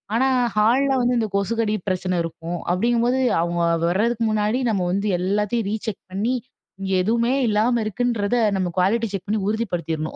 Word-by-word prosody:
ஆனா 260 +3 +3 0.3
ஹால்ல 255 +6 +3
வந்து 245 +1 +2
இந்த 220 -2 0
கொசுக்கடி 215 +2 0
பிரச்சனை 185 -1 -1
இருக்கும் 165 +1 -5
அப்படிங்கும்போது 240 +6 +1 0.2
அவங்க 170 0 -1 0.3
வர்றதுக்கு 230 +5 +1
முன்னாடி 215 +3 +1
நம்ம 190 -4 0
வந்து 200 +3 -1
எல்லாத்தையும் 210 +3 0
ரீசெக் 220 -2 -4
பண்ணி 215 +7 -1 0.5
இங்க 195 0 -3
எதுவுமே 235 +4 +1 0.2
இல்லாம 225 +3 +2
இருக்குன்றத 230 0 -1 0.2
நம்ம 180 -2 -1
குவாலிட்டி 225 +5 +2
செக் 195 +1 -5
பண்ணி 215 0 +1
உறுதிப்படுத்திரணும். 170 -8 -3
215 Hz, 150 wpm, -22 LUFS, 185-235 Hz, 0.5 s, ஆனா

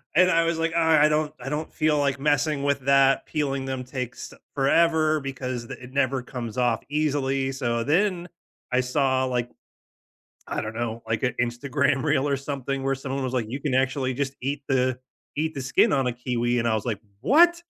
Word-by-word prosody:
And 185 +2 +5
I 165 0 +3
was 165 -1 0
like, 165 0 -1
"Uh, - - 0
I 160 -2 +5
don't 150 0 +1
I 125 - -8
don't 150 +2 -3
feel 155 -1 +1
like 140 -1 0
messing 145 0 +1
with 140 -1 +1
that," 135 0 +3
peeling 140 -3 -2
them 130 -1 -3
takes 125 -1 -6 0.2
forever 155 +2 +3
because 130 -3 -5
th - - -7
it 125 +1 -12
never 135 -2 +1
comes 120 -3 -6
off 120 -3 +1
easily. 140 -3 0
So 120 -3 -1
then, 175 - +1 0.4
I 125 - +3
saw 130 0 +1
like 125 -1 -2 1.0
I - - -2
don't 110 +1 -6
know, 115 0 -3
like, 110 - -1
an 125 -2 +1
Instagram 135 +3 0
reel 135 - +2
or 140 - +1
something 135 -1 -4
where 135 0 +1
someone 135 0 -4
was 130 - -2
like, 120 -4 0
you 135 +3 -5
can 145 -3 -1
actually 130 0 +1
just 135 +1 -3
eat 140 +2 -3
the 130 -1 +1 0.4
eat 160 +1 -1
the 135 - -3
skin 130 - +3
on 135 -2 +2
a 125 - -1
kiwi, 120 0 -1
and 120 - 0
I 110 - +2
was 110 - -2
like, 110 -5 -2 0.2
"What?" 340 - +5
135 Hz, 205 wpm, -25 LUFS, 125-150 Hz, 1.0 s, And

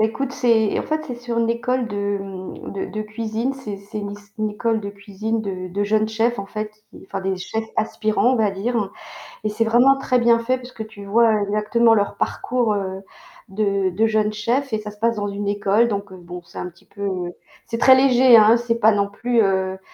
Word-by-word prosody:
Ecoute, 225 +5 0
c'est 230 -5 +2
en - - -1
fait 310 0 -1
c'est 245 - -4
sur 240 -1 -3
une 230 0 +2
école 245 +1 -1
de 205 -1 -2 0.5
de 195 - -4
de 215 +1 -4
cuisine, 220 +4 -3
c'est 220 -7 -7
c'est 205 +2 -7 0.2
c'est 205 0 -19
une 215 0 0
école 225 +2 0
de 200 -1 -5
cuisine 205 +2 -4
de 185 -3 -4
de 190 +3 -2
jeunes 215 +1 +1
chefs 230 +2 0
en 200 - -4
fait, 215 +1 -5 0.4
enfin, - - -4
des 190 0 -1
chefs 220 +5 -4
aspirants, 220 +2 +1
on - - 0
va 215 -3 +2
dire, 205 +1 -1 0.5
et - - +1
c'est 215 +2 -1
vraiment 245 +4 +5
très 255 -2 +1
bien 235 -1 +4
fait 255 +3 0
puisque 245 -3 -8
tu 205 -2 -11
vois 225 +3 +4
exactement 215 +3 +3
leur 205 -2 0
parcours, 245 -3 0
heu, 190 -1 -3 0.5
de 195 -1 0
de 210 +5 +2
jeunes 215 -1 +1
chefs 240 +6 -1
et 215 - 0
ça 210 0 -7
se 210 - -16
passe 230 +2 +2
dans 205 -2 -3
une 200 0 -4
école 205 +2 +2
donc, 200 -3 -3
heu, 190 - -10
bon, 175 0 -9
c'est - - -12
un - - -4
petit 170 -1 -20
peu, 200 0 -5 0.6
c'est 230 - -4
très 260 +2 +7
léger, 260 -2 +6
hein, 220 +1 +7
c'est 235 -1 -1
pas 220 - +6
non 200 -1 +1
plus, 235 +4 0
heu 190 -2 +1
215 Hz, 215 wpm, -21 LUFS, 200-235 Hz, 0.6 s, très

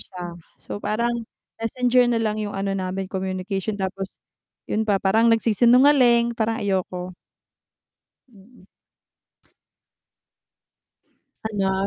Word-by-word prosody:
siya. 175 -1 -8 0.2
So, 205 - -8
parang 235 +1 -1 0.3
Messenger 245 +2 +2
na 240 -1 +1
lang 215 -1 -1
yung 210 -1 -4
ano 195 0 -2
namin, 190 0 -3
communication 190 +2 -3
tapos 195 -1 -4 0.6
yun 220 +1 0
pa, 200 -2 +1
parang 220 +4 +3
nagsisinungaling, 235 +2 +5
parang 225 0 0
ayoko. 185 -2 -2 1.2
Mm. 200 0 -20 2.8
Hala. 195 -2 0
210 Hz, 95 wpm, -23 LUFS, 190-235 Hz, 2.8 s, nagsisinungaling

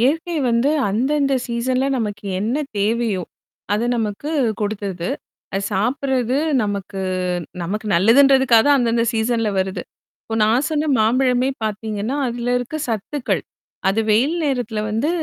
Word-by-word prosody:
இயற்கை 325 +7 +1
வந்து 235 +5 +2 0.2
அந்தந்த 275 +6 +1
சீசன்ல 255 +2 0
நமக்கு 210 -2 -4 0.2
என்ன 220 +5 -1 0.2
தேவையோ! 215 -2 0 0.5
அத 210 +2 +1
நமக்கு 220 +7 -3 0.3
குடுத்தது. 200 -4 -3 0.4
அத 195 - 0
சாப்புட்றது 250 +4 0 0.3
நமக்கு 200 -1 -3 0.6
நமக்கு 210 +5 -3
நல்லதுன்றதுக்காக 250 +5 +5
அந்தந்த 235 -2 +2
சீசன்ல 225 0 0
வருது. 190 0 -1 0.4
இப்ப 225 - -3
நான் 240 +6 +2
சொன்ன 305 0 0
மாம்பழமே 250 +3 +2 0.2
பாத்தீங்கன்னா, 215 +3 -3
அது 240 0 -4 0.2
இருக்க 245 +5 -5
சத்துக்கள். 235 +5 -2 0.5
அது 205 +3 +2
வெயில் 265 +10 +3
நேரத்தில 245 -6 -1
வந்து 225 +8 0
230 Hz, 120 wpm, -20 LUFS, 210-265 Hz, 0.6 s, நல்லதுன்றதுக்காக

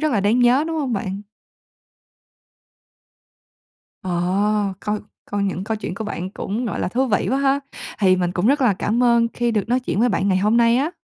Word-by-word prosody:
rất 310 -3 0
là 205 - +2
đáng 210 +5 +2
nhớ, 250 +4 +4
đúng 325 -1 -2
không 270 -5 -2
bạn? 195 -1 -3 2.8
Ờ. 190 +3 0
Coi 210 0 -2 0.3
coi 205 0 -1
những 195 -1 -2
câu 220 0 -2
chuyện 210 -4 -5
của 220 - -5
bạn 185 -2 -5
cũng, 215 +5 -4
gọi - - -3
là, - - -1
thú 260 +7 0
vị 210 - 0
quá 265 - +1
ha, 275 0 +2 0.4
thì 185 -3 +4
mình 175 -1 -1
cũng 185 +4 0
rất 280 +2 +3
là 230 -7 +3
cảm 230 +6 0
ơn 235 -1 +4
khi 240 -1 0
được 220 -1 -1
nói 250 +2 +2
chuyện 215 - -2
với 245 - +4
bạn 200 -1 0
ngày 185 - +2
hôm 210 +4 +2
nay 235 0 +4
á. 285 +6 0
215 Hz, 210 wpm, -21 LUFS, 195-245 Hz, 2.8 s, nhớ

